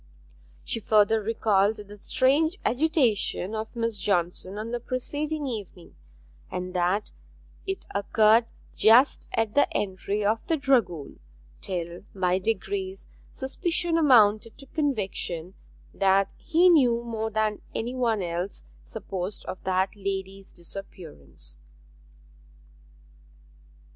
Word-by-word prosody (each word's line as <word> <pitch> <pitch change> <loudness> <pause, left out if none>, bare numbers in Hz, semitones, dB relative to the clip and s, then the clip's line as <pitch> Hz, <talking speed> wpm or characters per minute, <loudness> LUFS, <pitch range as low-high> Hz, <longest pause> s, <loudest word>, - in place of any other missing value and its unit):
She 230 - -2
further 215 +1 +3
recalled 210 -1 +2
the 205 0 -10
strange 290 - +2
agitation 245 - +1
of 220 +2 -5
Miss 230 -3 -1
Johnson 185 0 -1
on 220 +2 -5
the 240 - -2
preceding 290 +5 -3
evening, 205 -8 -7 0.5
and 180 0 -5
that 180 +3 0 0.6
it 385 0 -3
occurred 215 +3 +4 0.3
just 240 +6 +5
at 225 -2 0
the 285 - +3
entry 200 +1 -2
of 220 +2 +2
the 325 - +2
dragoon, 230 - 0 0.4
till 175 -2 -4
by 185 -1 +1
degrees 375 - -3 0.3
suspicion 335 +5 -1
amounted 230 -8 +4
to 275 - -11
conviction 195 - -2 0.4
that 195 0 +2
he 335 +2 +3
knew 250 -9 +4
more 220 -2 -3
than 215 -1 -1
any 235 +3 -2
one 230 -6 0
else 175 +3 -4 0.2
supposed 195 -3 -6
of - - -7
that 190 +1 +1
lady's 195 -1 -5
disappearance. 170 - -10
215 Hz, 110 wpm, -26 LUFS, 190-255 Hz, 0.6 s, just